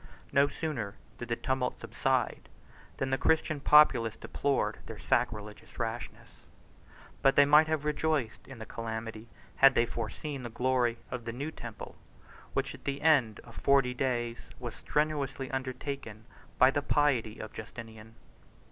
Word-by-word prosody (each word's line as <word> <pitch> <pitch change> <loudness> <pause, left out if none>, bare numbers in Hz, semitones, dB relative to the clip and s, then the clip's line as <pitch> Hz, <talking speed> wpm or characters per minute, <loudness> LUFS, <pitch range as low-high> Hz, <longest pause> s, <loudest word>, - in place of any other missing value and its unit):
No 140 0 +5
sooner 135 -9 -4 0.2
did 120 - -5
the 120 - 0
tumult 130 -1 -2
subside, - - -1 0.5
than 135 0 -2
the 135 - +1
Christian 155 -2 +2
populace 140 -7 +5
deplored 140 -1 -1
their - - -7
sacrilegious 105 0 -2
rashness; 115 0 -5 0.8
but 135 - +4
they 145 - +7
might 150 +2 +6
have 155 -2 -1
rejoiced 150 -5 -1
in 135 - -10
the 110 - -7
calamity, 110 0 -6 0.3
had 135 -1 +7
they 120 - +4
foreseen 120 +6 -5
the 120 - -6
glory 125 0 +1
of 125 -2 -5
the 115 - -3
new 140 +6 -4
temple, 120 -7 -9 0.6
which - - -1
at - - -14
the 140 +1 -3
end 135 -10 +3
of 115 - -15
forty 135 -3 +3
days 120 -2 -1 0.2
was 120 -3 -6
strenuously 145 -3 -1
undertaken 130 -4 -5 0.3
by 130 +1 +6
the 145 - 0
piety 130 -7 +1
of 110 - -8
Justinian. 110 0 -10
125 Hz, 150 wpm, -30 LUFS, 115-140 Hz, 0.8 s, they